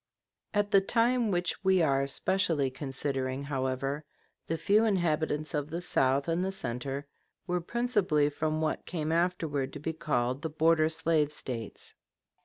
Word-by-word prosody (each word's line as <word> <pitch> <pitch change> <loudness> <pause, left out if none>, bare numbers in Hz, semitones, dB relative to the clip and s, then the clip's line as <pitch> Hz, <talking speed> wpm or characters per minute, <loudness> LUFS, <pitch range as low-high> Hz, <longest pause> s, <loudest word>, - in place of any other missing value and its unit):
] - - -62
At 205 -1 +1
the 195 - +6
time 235 +2 +2
which 175 +1 -1
we 190 -1 +4
are 140 -2 +2
specially 150 -2 +1
considering, 135 0 -2
however, 135 +1 -2 0.4
the 165 - -1
few 210 +6 +3
inhabitants 155 -7 0
of 145 -1 -1
the 165 +2 -3
south 135 -4 +1
and 170 +2 +1
the 190 - -1
center 135 -3 -3 0.4
were 180 -1 -1
principally 190 -9 +1
from 155 +1 -1
what 155 -1 -2
came 160 -3 -2
afterwards 165 -5 0
to 145 - -6
be 160 +3 -3
called 130 -4 -1
the 160 - -2
border 160 +1 +3
slave 160 -2 +1
States. 120 -7 -6
155 Hz, 155 wpm, -30 LUFS, 140-180 Hz, 0.4 s, the